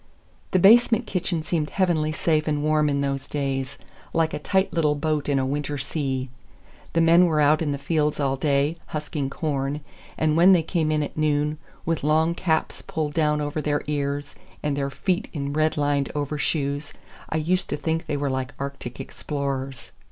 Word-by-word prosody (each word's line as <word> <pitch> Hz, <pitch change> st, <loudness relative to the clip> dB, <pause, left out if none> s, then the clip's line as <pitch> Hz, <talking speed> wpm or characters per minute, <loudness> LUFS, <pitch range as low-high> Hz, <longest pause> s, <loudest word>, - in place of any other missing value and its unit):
The -, -, +2 dB
basement 225 Hz, +4 st, +6 dB
kitchen 180 Hz, -4 st, -1 dB
seemed 155 Hz, -2 st, -1 dB
heavenly 170 Hz, -5 st, +1 dB
safe 155 Hz, -1 st, +1 dB
and 150 Hz, -1 st, 0 dB
warm 155 Hz, -1 st, +3 dB
in 140 Hz, 0 st, 0 dB
those 135 Hz, -1 st, -2 dB
days—like 140 Hz, +3 st, -3 dB
a -, -, -2 dB
tight 190 Hz, +5 st, +1 dB
little 150 Hz, -3 st, +2 dB
boat 150 Hz, 0 st, -1 dB
in 140 Hz, -, +2 dB
a 135 Hz, -, +1 dB
winter 145 Hz, +2 st, -2 dB
sea. 135 Hz, -2 st, -3 dB, 0.6 s
The 165 Hz, -, +3 dB
men 170 Hz, +2 st, +6 dB
were 155 Hz, -2 st, +1 dB
out 150 Hz, +2 st, +4 dB
in 150 Hz, -3 st, 0 dB
the 140 Hz, -, -1 dB
fields 150 Hz, +1 st, 0 dB
all 135 Hz, -2 st, +1 dB
day, 140 Hz, +3 st, +1 dB
husking 150 Hz, -2 st, -3 dB
corn, 140 Hz, -1 st, -2 dB, 0.4 s
and 155 Hz, -1 st, +2 dB
when 180 Hz, +4 st, +7 dB
they 170 Hz, -3 st, +4 dB
came 160 Hz, -1 st, 0 dB
in 155 Hz, -1 st, +1 dB
at 145 Hz, -, -7 dB
noon, 150 Hz, 0 st, +1 dB, 0.3 s
with 165 Hz, -3 st, -1 dB
long 160 Hz, +3 st, +3 dB
caps 165 Hz, -2 st, -1 dB
pulled 155 Hz, -2 st, -3 dB
down 150 Hz, -2 st, +2 dB
over 145 Hz, +1 st, -2 dB
their 145 Hz, -1 st, 0 dB
ears 145 Hz, -1 st, -2 dB, 0.3 s
and 150 Hz, -1 st, 0 dB
their 140 Hz, -1 st, -1 dB
feet 185 Hz, +7 st, -1 dB
in 140 Hz, -3 st, -3 dB
red 155 Hz, +1 st, +1 dB
lined 145 Hz, -1 st, +1 dB
overshoes, 145 Hz, 0 st, -1 dB, 0.4 s
I 160 Hz, -, -1 dB
used 180 Hz, +4 st, 0 dB
to 145 Hz, -, -1 dB
think 165 Hz, +2 st, -2 dB
they 145 Hz, -, -1 dB
were 140 Hz, -1 st, -1 dB
like 130 Hz, +1 st, -3 dB
Arctic 140 Hz, -3 st, -6 dB
explorers. 135 Hz, -1 st, -4 dB
150 Hz, 180 wpm, -24 LUFS, 140-160 Hz, 0.6 s, when